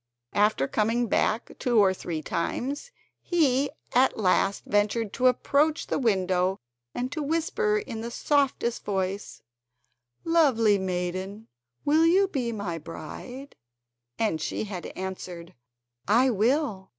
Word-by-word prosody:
After 205 -9 +2
coming 225 +6 +1
back 225 +1 0
two 245 -2 +1
or 195 -3 +5
three 165 -4 -5
times, 275 - -3 0.3
he 285 -5 +2 0.2
at 260 +2 +3
last 195 -1 +2
ventured 205 +1 0
to 255 - +3
approach 290 +5 +2
the - - -1
window 190 -5 +1 0.4
and 250 +1 -2
to 310 - -3
whisper 330 +9 0
in 235 - -5
the 235 - -4
softest 265 -2 0
voice: 195 0 -3 0.8
"Lovely 255 -11 +3
maiden, 185 +3 -3 0.4
will 315 +3 +4
you 385 +4 +4
be 255 -10 -2
my 200 -7 -4
bride?" 245 - -9 0.6
and 190 -9 0
she - - -2
had 195 -4 -6
answered: 180 -2 -6 0.5
"I 245 +6 +4
will." 225 -2 0
225 Hz, 125 wpm, -27 LUFS, 190-275 Hz, 0.8 s, or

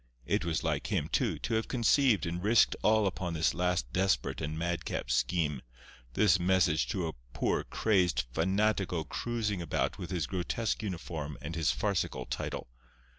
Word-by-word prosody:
It 100 - +1
was 85 -3 -1
like - - -1
him, - - -1
too, - - +1
to - - -3
have 110 0 0
conceived 125 - +3
and 85 +1 -3
risked 110 +3 +4
all 110 0 +4
upon 90 -3 -2
this 80 0 +2
last 90 -8 -1
desperate 95 -1 +1
and 75 0 -3
madcap 85 -7 -2
scheme—this 65 - 0
message 90 -3 +2
to 90 -4 -1
a 80 - -4 0.2
poor, - - 0
crazed 90 - +1
fanatico 95 0 +1
cruising 110 -5 -2
about 85 - -1
with 90 - -5
his 85 -5 -1
grotesque 95 +8 -2
uniform 80 -7 -5
and 85 - -6
his 80 -5 +2
farcical - - -1
title. - - -4
90 Hz, 155 wpm, -31 LUFS, 80-100 Hz, 0.2 s, risked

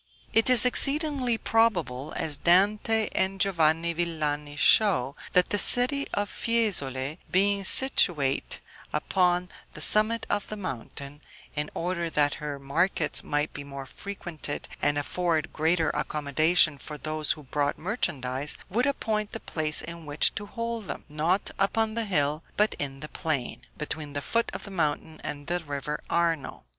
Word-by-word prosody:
It 225 +2 +4
is 250 -2 +6
exceedingly 275 -2 +4
probable, 170 - 0
as 155 -2 -1
Dante 205 +6 +3
and 190 +1 0
Giovanni 170 -3 +2
Villani 150 -3 -2
show, 145 - +4 0.2
that 180 0 +3
the 205 - +2
city 255 +6 +6
of 205 0 -1
Fiesole, 160 - -1
being 200 +1 +2
situate 170 - +2 0.3
upon 180 -1 +1 0.2
the - - -8
summit 215 +2 +3
of 205 - -2
the 215 - -6
mountain, 140 - -7 0.3
in 150 0 -2
order 170 -1 -2
that 145 -2 +2
her 145 -1 -4
markets 145 +4 0
might 150 +1 -2
be - - -7
more 140 -1 -8
frequented, 170 -2 -7
and 145 0 +1
afford 160 +1 -1
greater 160 +1 +1
accommodation 150 +1 +2
for 150 +2 -8
those 155 0 -2
who 150 - -13
brought 145 +2 -1
merchandise, 145 - -2
would 245 +7 +1
appoint 215 -6 -2
the 225 - -4
place 155 -6 +1
in 170 -1 -9
which 145 +1 +2
to 205 -1 -6
told 230 -3 -4
them, - - -6
not 160 +6 0
upon 220 +3 +1
the 230 0 -2
hill, 150 -5 0 0.2
but 210 +1 +2
in 135 -1 -4
the 150 - -6
plain, 140 -6 -3 0.2
between 150 -1 -5
the 145 - -2
foot 230 0 0
of - - -7
the 200 - -9
mountain 155 -2 -2
and 145 -1 -6
the 175 +2 -1
river 145 -2 -5
Arno. 165 -4 -1
165 Hz, 150 wpm, -27 LUFS, 145-205 Hz, 0.3 s, is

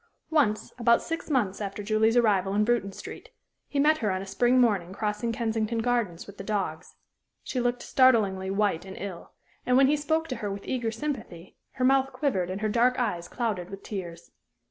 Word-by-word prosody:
Once, 265 -10 +1
about 235 0 +5
six 330 0 -5
months 215 -9 0
after 200 0 -4
Julie's 220 +2 +2
arrival 200 -4 +3
in 210 - +3
Bruton 230 -4 +1
Street, - - -9 0.4
he 290 - -5
met 305 +2 +4
her 215 - 0
on 185 -1 -1
a 195 - -6
spring 245 +6 +2
morning 200 -7 +2
crossing 210 +2 -2
Kensington 225 0 -1
Gardens 225 -7 -1
with 200 0 -13
the - - -5
dogs. 190 -5 -3 0.5
She 255 - -3
looked 245 0 -1
startlingly 210 -8 +3
white 195 -4 0
and 190 0 -9
ill, 190 -4 -7 0.3
and 250 0 +3
when 270 - +7
he 290 +3 +3
spoke 315 +2 0
to 255 - -3
her 210 -3 -3
with 200 0 -7
eager 245 -3 -1
sympathy 225 - -6 0.2
her 255 -1 0
mouth 270 0 +3
quivered 195 - 0
and 190 +2 -4
her 215 - +1
dark 240 +3 +2
eyes 175 -9 -1
clouded 210 -7 -3
with 195 0 -9
tears. 175 -5 -7
220 Hz, 195 wpm, -27 LUFS, 195-250 Hz, 0.5 s, when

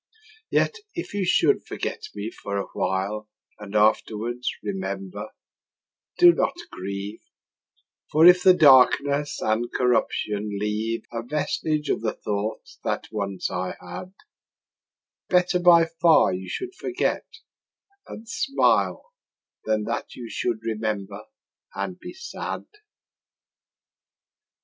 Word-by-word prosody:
Yet 450 - +1 0.2
if 345 - -5
you 200 -2 0
should - - +3
forget - - -4
me 105 +2 -4
for 100 -3 -5
a 100 - -2
while 105 +3 -2 0.3
And 105 0 -9
afterwards 110 +3 +1
remember, 195 -1 -4 0.9
do 350 -1 +8
not - - 0 0.2
grieve: 100 +2 -6 0.9
For 155 +2 +5
if 180 0 +8
the 185 0 +7
darkness 145 -1 +5
and 115 +2 0
corruption 105 -4 0
leave 110 +2 -2
A 115 - -2
vestige 150 +3 -2
of - - -1
the 110 -1 -1
thoughts 105 +1 -4
that - - -2
once 100 -3 -3
I 90 0 -3
had, 90 - -8 1.2
Better 180 0 +3
by 175 -2 +7 0.2
far 165 - +5
you 95 +1 -5
should 375 0 -4
forget 375 0 -2 0.8
and 225 - -10
smile 275 - +1 0.5
Than 110 -1 +1
that - - -4
you 120 -2 -8
should 115 -3 -2
remember 105 -2 -3 0.5
and 95 -1 -4
be - - -9
sad. 380 +1 -6
115 Hz, 115 wpm, -25 LUFS, 105-175 Hz, 1.2 s, do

